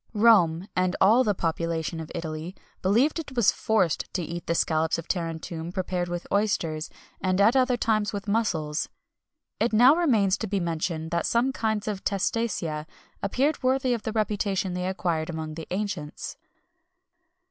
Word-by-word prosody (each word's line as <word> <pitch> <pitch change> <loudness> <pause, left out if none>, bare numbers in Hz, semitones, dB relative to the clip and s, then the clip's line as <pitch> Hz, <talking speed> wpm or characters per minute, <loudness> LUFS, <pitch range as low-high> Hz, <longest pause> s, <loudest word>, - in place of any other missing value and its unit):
Rome, 195 -6 +5
and 185 0 +1
all 225 +7 +6
the 210 -4 +1
population 165 -1 -2
of 160 - -7
Italy, 160 +2 -5 0.3
believed 240 - +3
it 285 -4 -7
was 235 -5 +5
forced 205 -7 0
to 180 - 0
eat 170 +1 -6
the 170 - +1
scallops 160 0 +1
of 165 - -7
Tarentum 165 -1 -3
prepared 180 -1 -2
with 175 0 -4
oysters, 170 -7 0 0.3
and 185 0 +1
at 215 +5 +5
other 255 -2 +3
times 215 -3 +1
with 205 0 -5
mussels. 170 -8 0 0.7
It 230 - +1
now 245 +7 +7
remains 225 - +2
to 220 - -3
be 200 0 0
mentioned 165 -1 -2
that 170 0 0
some 240 +3 +2
kinds 220 -4 -1
of 205 -3 -3
testacea 190 -7 -1 0.3
appeared 270 +10 0
worthy 260 0 +2
of 235 - -2
the 220 - -3
reputation 205 -3 0
they 180 0 -2
acquired 170 -4 -1
among 160 -2 -4
the 160 0 -7
ancients. 185 -6 -4
190 Hz, 160 wpm, -26 LUFS, 165-220 Hz, 0.7 s, now